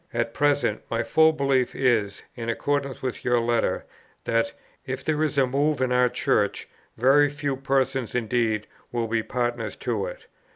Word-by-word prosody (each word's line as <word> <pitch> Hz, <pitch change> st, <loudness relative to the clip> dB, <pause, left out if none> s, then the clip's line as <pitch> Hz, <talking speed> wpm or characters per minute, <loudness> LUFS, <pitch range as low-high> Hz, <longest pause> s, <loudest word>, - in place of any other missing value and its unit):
"At 120 Hz, -1 st, -1 dB
present, 145 Hz, -7 st, +1 dB
my 115 Hz, -, 0 dB
full 160 Hz, 0 st, +5 dB
belief 135 Hz, -4 st, +1 dB
is, 115 Hz, -6 st, +1 dB
in 115 Hz, -1 st, -4 dB
accordance 140 Hz, +3 st, -1 dB
with 130 Hz, -2 st, -3 dB
your 120 Hz, -1 st, +3 dB
letter, 115 Hz, 0 st, 0 dB, 0.4 s
that, 115 Hz, 0 st, +1 dB, 0.3 s
if 130 Hz, -1 st, -5 dB
there 155 Hz, -1 st, 0 dB
is 155 Hz, -2 st, 0 dB
a 135 Hz, -, +5 dB
move 140 Hz, +3 st, +1 dB
in 130 Hz, -1 st, 0 dB
our 125 Hz, 0 st, +4 dB
Church, 105 Hz, -4 st, 0 dB, 0.3 s
very 140 Hz, +4 st, +5 dB
few 145 Hz, -1 st, -2 dB
persons 135 Hz, -2 st, 0 dB
indeed 115 Hz, -2 st, 0 dB, 0.3 s
will 120 Hz, -1 st, -1 dB
be 115 Hz, 0 st, 0 dB
partners 120 Hz, -2 st, -2 dB
to 115 Hz, -6 st, -2 dB
it. -, -, -9 dB
125 Hz, 165 wpm, -25 LUFS, 115-140 Hz, 0.4 s, full